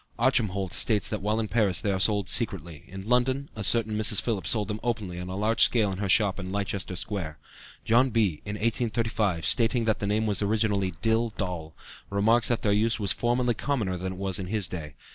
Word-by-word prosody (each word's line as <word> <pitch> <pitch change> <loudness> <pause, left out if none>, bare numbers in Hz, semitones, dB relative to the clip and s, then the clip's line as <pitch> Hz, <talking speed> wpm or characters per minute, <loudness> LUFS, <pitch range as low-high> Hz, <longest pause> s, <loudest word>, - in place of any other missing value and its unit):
Archemholtz 110 -7 +1
states 110 -3 +1
that 105 - -4
while 105 +2 -1
in 110 - -2
Paris 100 -5 +1
they 100 - -1
are - - 0
only 95 - -2
sold 100 -2 +1
secretly, 85 - +1
in 95 +2 -9
London 130 +3 +1
a 110 - -5
certain 110 +1 +3
Mrs. 105 -1 +4
Philips 95 -8 -2
sold 105 -3 +2
them 105 0 -4
openly 105 -7 -3
on 90 0 -6
a 95 - -5
large 110 +3 0
scale 110 -5 +4
in 95 - -5
her 100 -1 -2
shop 100 0 +3
in 95 -1 -6
Leicester 100 -2 -3
Square. 90 -5 -4 0.5
John 120 +4 +3
Bee 105 -10 0
in 105 0 -5
1835, 110 -5 -1
stating 115 0 +2
that 110 -1 0
the 100 - -3
name 110 +2 0
was 105 -1 0
originally 100 -3 0
dil 115 +1 +2
dol, 85 -5 -5 0.3
remarks 110 +4 +3
that 120 - -1
their 105 - +2
use 110 +3 +1
was 100 -3 +2
formerly 120 +1 0
commoner 115 -6 -2
than 95 +1 -5
it - - -11
was 95 -1 0
in 95 - -5
his 105 -2 -1
day. 80 -4 -7
105 Hz, 220 wpm, -26 LUFS, 95-115 Hz, 0.5 s, Mrs